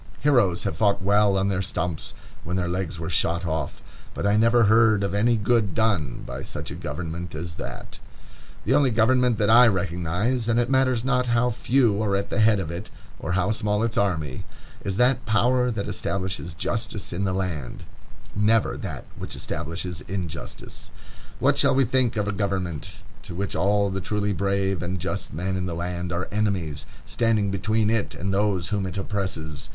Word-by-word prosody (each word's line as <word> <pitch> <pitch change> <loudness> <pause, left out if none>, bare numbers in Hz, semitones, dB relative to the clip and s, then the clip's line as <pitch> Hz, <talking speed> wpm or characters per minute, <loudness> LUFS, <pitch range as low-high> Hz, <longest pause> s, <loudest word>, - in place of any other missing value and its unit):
Heroes 120 -12 +3
have - - -2
fought 100 -3 +2
well 100 0 +4
on 95 +1 +1
their 95 -1 0
stumps 90 -4 -3 0.3
when 90 - -3
their 90 -2 0
legs 90 -1 -2
were 80 - -4
shot 85 +1 +1
off, 80 -4 -3 0.3
but - - -3
I 100 +1 +3
never 115 +2 +5
heard 110 -1 +5
of 100 - -1
any 115 +3 +3
good 105 -3 +1
done 100 - 0
by - - -6
such - - -6
a - - -5
government 85 +2 -5
as 85 +1 -4
that. - - -8 0.7
The - - +2
only 140 -3 +4
government 120 +1 +3
that 105 -1 +3
I 120 +2 +8
recognize,—and 100 +6 0
it 120 +2 0
matters 130 -3 +2
not 125 -1 +2
how 120 +1 +2
few 115 -3 +2
are 100 -2 +1
at 100 - -2
the - - 0
head 110 -2 +5
of 85 -4 -3
it, 90 +5 -6 0.3
or 85 - -3
how 95 +2 +1
small 105 -1 0
its 115 -1 -1
army,—is 90 +2 -3
that 125 0 +3
power 125 +3 +3
that 110 -4 -3
establishes 90 -4 -3
justice 110 +2 -3
in 90 +3 -2
the 95 - +1
land, 90 -8 -3 0.5
never 105 +2 +2
that - - -6
which - - -7
establishes 85 +1 -4
injustice. 90 -4 -6 0.5
What - - +2
shall - - +5
we 135 0 +4
think 125 -1 +1
of 105 -1 0
a - - +1
government 95 -6 -3 0.2
to 85 - -9
which 100 +2 -3
all 100 0 +2
the 95 0 -3
truly 105 +1 -1
brave 95 +1 0
and 90 +1 -3
just 95 +3 -3
men 90 +6 -2
in 90 0 -2
the 85 - -3
land 90 +1 -3
are 85 +1 -2
enemies, 100 -8 -1 0.2
standing 105 +5 +1
between 110 +3 +1
it 115 -2 0
and 95 +2 -2
those 95 -3 +1
whom 100 -2 -1
it 95 - -5
oppresses? 95 -7 -4
100 Hz, 185 wpm, -25 LUFS, 90-110 Hz, 0.7 s, I